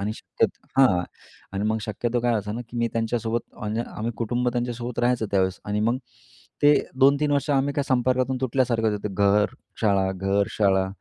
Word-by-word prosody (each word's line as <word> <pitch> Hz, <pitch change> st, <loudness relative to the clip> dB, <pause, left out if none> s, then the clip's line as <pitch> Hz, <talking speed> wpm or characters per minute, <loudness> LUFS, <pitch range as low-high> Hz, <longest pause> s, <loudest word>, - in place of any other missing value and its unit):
आणि 105 Hz, +2 st, -2 dB
शक्यतो -, -, -2 dB
हां 95 Hz, -10 st, +5 dB, 0.5 s
अन् 100 Hz, +1 st, -2 dB
मग 110 Hz, 0 st, +1 dB
शक्यतो 115 Hz, +3 st, -2 dB
काय 120 Hz, 0 st, +1 dB, 0.2 s
ना, 120 Hz, -, -4 dB
की 120 Hz, -, -8 dB
मी 115 Hz, -, +1 dB
त्यांच्यासोबत 115 Hz, 0 st, -1 dB, 0.2 s
म्हणजे 110 Hz, +2 st, -2 dB
आम्ही 115 Hz, +2 st, -2 dB
कुटुंब 120 Hz, +3 st, 0 dB
त्यांच्यासोबत 120 Hz, 0 st, -3 dB
राहायचं 120 Hz, -2 st, +1 dB
त्यावेळेस 95 Hz, -1 st, +1 dB
आणि 105 Hz, 0 st, -1 dB
मग 115 Hz, +4 st, +1 dB, 0.6 s
ते 145 Hz, 0 st, +7 dB, 0.3 s
2-3 140 Hz, +2 st, +4 dB
वर्ष 145 Hz, +1 st, 0 dB
आम्ही 140 Hz, 0 st, +2 dB
काय 145 Hz, -, +1 dB
संपर्कातून 130 Hz, 0 st, +1 dB
तुटल्यासारखं 120 Hz, -3 st, +1 dB
होतं. 105 Hz, -1 st, -4 dB
घर-शाळा, 100 Hz, 0 st, +1 dB
घर-शाळा, 95 Hz, 0 st, +1 dB
115 Hz, 160 wpm, -24 LUFS, 105-125 Hz, 0.6 s, ते